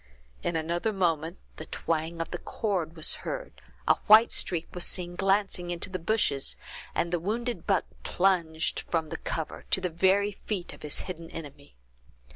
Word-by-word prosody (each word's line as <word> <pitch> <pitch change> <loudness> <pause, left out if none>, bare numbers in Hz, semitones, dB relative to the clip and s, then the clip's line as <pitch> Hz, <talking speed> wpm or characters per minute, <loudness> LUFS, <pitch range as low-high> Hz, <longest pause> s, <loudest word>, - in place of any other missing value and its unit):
In 170 - -1
another 170 +6 0
moment 170 -3 0 0.2
the 155 - -7
twang 165 +1 -1
of 165 - -4
the 175 - -3
cord 180 -7 -2
was 160 - +2
heard, - - -5 0.3
a - - +6
white 220 +2 +9
streak 170 -2 -1
was 180 - 0
seen 175 -1 0
glancing 195 -2 +1
into 175 +2 -3
the 185 - -2
bushes, 165 -7 +1 0.4
and 170 +1 0
the 175 - +2
wounded 220 +1 -2
buck 195 -3 +3 0.2
plunged 175 -4 +1
from 160 -2 0
the - - -4
cover, 160 - -4
to - - +4
the 185 -1 -1
very 190 +4 +3
feet 195 -2 -4
of - - -14
his 150 - +1
hidden 165 -3 -7
enemy. 145 -3 -9
175 Hz, 170 wpm, -29 LUFS, 165-195 Hz, 0.4 s, white